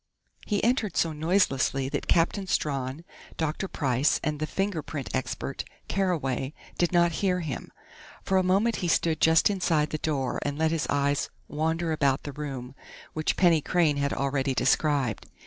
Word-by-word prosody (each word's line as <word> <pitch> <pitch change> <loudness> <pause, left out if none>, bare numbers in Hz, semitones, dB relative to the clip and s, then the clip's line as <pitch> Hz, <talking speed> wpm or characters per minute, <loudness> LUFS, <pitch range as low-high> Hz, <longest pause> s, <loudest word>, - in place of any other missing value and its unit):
He 205 -2 0
entered 230 -5 +1
so 165 -1 +2
noiselessly 150 -5 +1
that - - -3
Captain 180 +3 +2
Strawn, 140 -1 -1 0.3
Dr. 160 +4 -2
Price 135 -3 +1
and 150 -1 -1
the 155 - -1
fingerprint 155 -8 -3
expert, 130 +1 -3 0.2
Carraway, 150 -8 -1 0.2
did 175 - +2
not 175 -1 +4
hear 180 -2 +1
him. 155 -6 -5 0.5
For 190 0 +2
a - - +1
moment 200 +6 +2
he 180 - -2
stood 165 -1 +1
just 160 +4 +5
inside 165 -6 +1
the 155 - -2
door 140 -5 -1
and 145 0 -2
let 160 0 +2
his 165 -2 -1
eyes 140 0 +1 0.2
wander 160 +2 -1
about 140 -4 +1
the 145 - -5
room 135 -3 -6 0.4
which 155 0 -1
Penny 170 -4 +4
Crain 160 -3 +2
had 140 0 0
already 135 -1 0
described. 135 -3 +1
155 Hz, 160 wpm, -27 LUFS, 140-175 Hz, 0.5 s, just